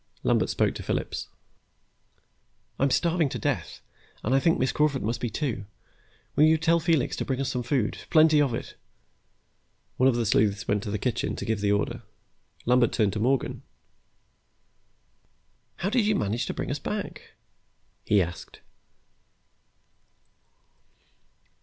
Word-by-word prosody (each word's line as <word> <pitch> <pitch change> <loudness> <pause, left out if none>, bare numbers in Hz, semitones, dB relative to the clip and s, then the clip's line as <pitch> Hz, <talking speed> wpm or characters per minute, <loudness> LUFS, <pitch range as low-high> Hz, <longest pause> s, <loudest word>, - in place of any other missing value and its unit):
Lambert - - +2
spoke - - +1
to - - -7
Phillips. - - -3 1.5
"I'm 140 - +3
starving 165 +1 +2
to - - -4
death - - -3 0.4
and 120 - 0
I 135 - +5
think 165 +4 +2
Miss 130 - +1
Crawford 150 -3 +1
must 115 +3 -2
be, 120 - -1
too. 115 -8 -3 0.7
Will 150 - +6
you 160 +1 +5
tell 165 +1 +2
Felix 160 -5 +1
to - - -1
bring 130 -1 -2
us 135 -1 -1
some 125 - -2
food, 120 -2 -1
plenty 155 -1 +5
of 140 -3 +2
it?" - - -6 1.2
One 130 +1 +5
of 125 - +1
the 120 -1 0
sleuths 105 -1 +1
went 105 0 +1
to 105 - -5
the 105 - -1
kitchen 120 +3 -2
to - - -5
give 110 -3 -1
the 100 0 +2
order. 105 0 -1 0.6
Lambert 125 -1 +3
turned 105 -4 +1
to 105 - -3
Morgan. 130 +3 0 2.1
"How 195 - -2
did 230 -3 +2
you 215 - +3
manage 105 +3 -1
to - - -2
bring - - -3
us 140 - -2
back?" 205 +7 -5 0.7
he 105 -3 +3
asked. 85 0 -9
130 Hz, 150 wpm, -26 LUFS, 110-155 Hz, 2.1 s, Will